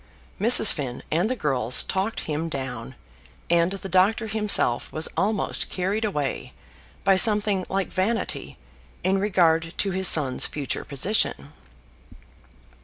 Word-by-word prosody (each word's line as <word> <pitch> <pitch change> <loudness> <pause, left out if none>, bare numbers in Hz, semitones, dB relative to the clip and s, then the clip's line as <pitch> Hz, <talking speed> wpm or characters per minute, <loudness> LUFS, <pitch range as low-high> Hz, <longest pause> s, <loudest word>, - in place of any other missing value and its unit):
Mrs. 220 0 +7
Finn 130 -5 -6
and 175 +7 0
the 255 - -1
girls 130 - +1
talked 195 +4 -3
him 160 +2 -4
down, 130 -3 -6 0.6
and 170 +2 +2
the 195 0 -7
doctor 195 +5 +2
himself 210 - -1
was 155 +1 -1
almost 205 0 -2
carried 195 +4 -2
away 150 -10 -3 0.5
by 195 -1 +4
something 205 -2 +2
like 195 0 -2
vanity 220 +5 -2 0.5
in 190 +2 +1
regard 165 -5 +1
to 195 - -1
his 190 0 +2
son's 140 -5 +3
future 145 -3 -4
position. 140 - 0
185 Hz, 125 wpm, -23 LUFS, 150-205 Hz, 0.6 s, Mrs